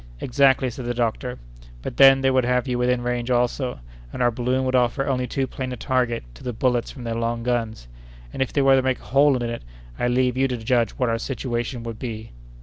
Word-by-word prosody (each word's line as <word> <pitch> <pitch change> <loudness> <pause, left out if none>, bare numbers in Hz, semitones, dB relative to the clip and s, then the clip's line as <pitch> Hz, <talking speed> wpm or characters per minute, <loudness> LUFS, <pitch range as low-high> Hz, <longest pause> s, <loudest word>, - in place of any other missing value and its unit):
"Exactly," 135 - +3
said 125 +1 -7
the 120 0 -2
doctor; 120 +1 -2 0.5
"but - - -5
then 135 0 +7
they 135 0 +3
would 130 -1 +3
have 125 +2 +1
you 125 -1 -1
within 125 0 +1
range 120 0 -2
also, 125 - 0 0.3
and - - -7
our 120 -1 +3
balloon 125 +3 -1
would 130 - -1
offer 125 +2 +2
only 125 -2 -1
too 135 +1 -1
plain 130 0 -5
a - - -3
target 125 -1 0
to 60 - -14
the 125 - -3
bullets 125 0 0
from 130 - -9
their 115 -1 -3
long 115 0 -2
guns; 115 - -2 0.5
and, - - -4
if 130 - 0
they 140 - +1
were 135 0 +6
to 130 - +3
make 130 -1 0
a - - -18
hole 140 0 +5
in 120 -1 -2
it, 115 0 -5 0.4
I 120 - +1
leave 125 0 +1
you 135 +1 +3
to 125 -2 -3
judge 115 0 +1
what 125 -2 -1
our 115 0 0
situation 120 -1 -3
would 115 -1 -6
be!" 110 -3 -6
125 Hz, 240 wpm, -23 LUFS, 120-130 Hz, 0.5 s, then